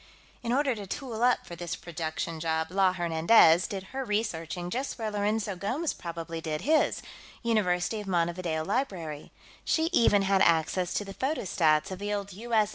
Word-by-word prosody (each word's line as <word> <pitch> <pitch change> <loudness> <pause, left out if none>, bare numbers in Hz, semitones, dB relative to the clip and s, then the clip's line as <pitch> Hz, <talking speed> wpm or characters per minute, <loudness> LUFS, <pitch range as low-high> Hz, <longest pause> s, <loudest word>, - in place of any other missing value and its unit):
"In 235 - -2
order 270 +1 +2
to 205 -3 -7
tool 235 +1 -5
up 245 0 +3
for 170 - -8
this 170 0 -4
production 165 0 -4
job, 160 0 -1
La 190 -1 +3
Hernandez 170 0 +5
did 195 -4 -5
her 270 0 -2
researching 180 -6 -2
just 265 +6 -3
where 220 -3 -3
Lourenço 210 0 -1
Gomes 255 - -2
probably 165 -1 -6
did 155 -2 -3
his 310 +2 +2 0.4
University 210 -2 +1
of 205 - -10
Montevideo 170 -2 -1
Library. 185 - -3 0.3
She 325 +1 +1
even 205 - +4
had 195 0 +3
access 170 +1 +2
to 205 - -1
the 195 - -8
photostats 185 - +1
of 185 - -5
the 205 +1 -3
old 200 -1 -3
U.S. 220 0 +1
195 Hz, 170 wpm, -28 LUFS, 170-225 Hz, 0.4 s, Hernandez